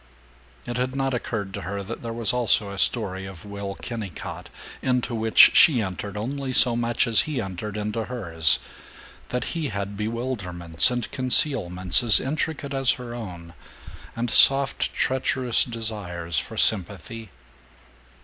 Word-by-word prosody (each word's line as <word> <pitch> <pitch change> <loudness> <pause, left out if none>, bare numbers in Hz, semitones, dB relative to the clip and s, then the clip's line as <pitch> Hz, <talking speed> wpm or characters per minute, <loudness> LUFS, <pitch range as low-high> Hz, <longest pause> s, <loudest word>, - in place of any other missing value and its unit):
It 120 - -5
had 130 +1 -3
not 135 -1 -2
occurred 110 -5 -4
to - - -6
her 100 +4 -5
that 110 +4 -8
there 115 - -6
was 115 -2 +3
also 115 -4 +1
a 100 - -5
story 95 -5 +1
of 95 0 -12
Will 100 -1 -7
Kennicott, 110 -8 -8 0.3
into 125 -1 -1
which 110 -1 +5
she 140 -6 +6
entered 100 0 -5
only 130 +4 -4
so 125 -2 +4
much 120 0 0
as 115 -3 +5
he 145 -4 -3
entered 100 +1 -6
into 105 +2 -4
hers; 85 - 0 0.7
that 125 - -3
he 165 -3 -3
had 100 -3 -5
bewilderments 105 -6 0
and 120 -2 -4
concealments 105 - +3
as 115 -3 +8
intricate 140 0 -4
as 135 -2 +2
her 120 -1 -9
own, 90 -8 -9 0.6
and 115 0 -3
soft 135 +4 +4
treacherous 130 -2 +1
desires 100 - -4
for - - -8
sympathy. 105 +2 -2
115 Hz, 145 wpm, -23 LUFS, 100-125 Hz, 0.7 s, as